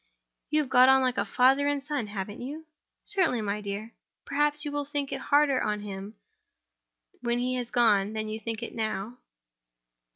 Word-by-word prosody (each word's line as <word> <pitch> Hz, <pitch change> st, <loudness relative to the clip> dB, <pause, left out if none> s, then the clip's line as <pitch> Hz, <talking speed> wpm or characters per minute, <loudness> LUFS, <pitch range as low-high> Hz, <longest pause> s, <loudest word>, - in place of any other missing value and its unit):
"You 305 Hz, +1 st, +3 dB
have 280 Hz, -, -5 dB
got 255 Hz, 0 st, +7 dB
on 265 Hz, 0 st, +5 dB
like 255 Hz, -1 st, +1 dB
father 270 Hz, +3 st, +4 dB
and 285 Hz, -1 st, 0 dB
son, 285 Hz, -6 st, -2 dB
haven't 205 Hz, +1 st, -6 dB
you?" 295 Hz, +6 st, -7 dB, 0.4 s
"Certainly, 360 Hz, -, +2 dB
my 210 Hz, 0 st, -2 dB
dear." 205 Hz, +3 st, -5 dB, 0.3 s
"Perhaps 295 Hz, +1 st, +1 dB
you 295 Hz, -, -3 dB
will 290 Hz, 0 st, -1 dB
think 285 Hz, -1 st, -3 dB
it 270 Hz, -1 st, -4 dB
harder 285 Hz, -2 st, +4 dB
on 210 Hz, -1 st, -1 dB
him 200 Hz, +1 st, -7 dB, 1.1 s
when 240 Hz, 0 st, 0 dB
he 250 Hz, +1 st, 0 dB
has 245 Hz, -1 st, -3 dB
gone 215 Hz, -4 st, +3 dB
than 215 Hz, 0 st, -3 dB
you 215 Hz, +1 st, -4 dB
think 225 Hz, 0 st, -5 dB
it -, -, -6 dB
now?" 220 Hz, +1 st, -3 dB
245 Hz, 175 wpm, -28 LUFS, 215-285 Hz, 1.1 s, got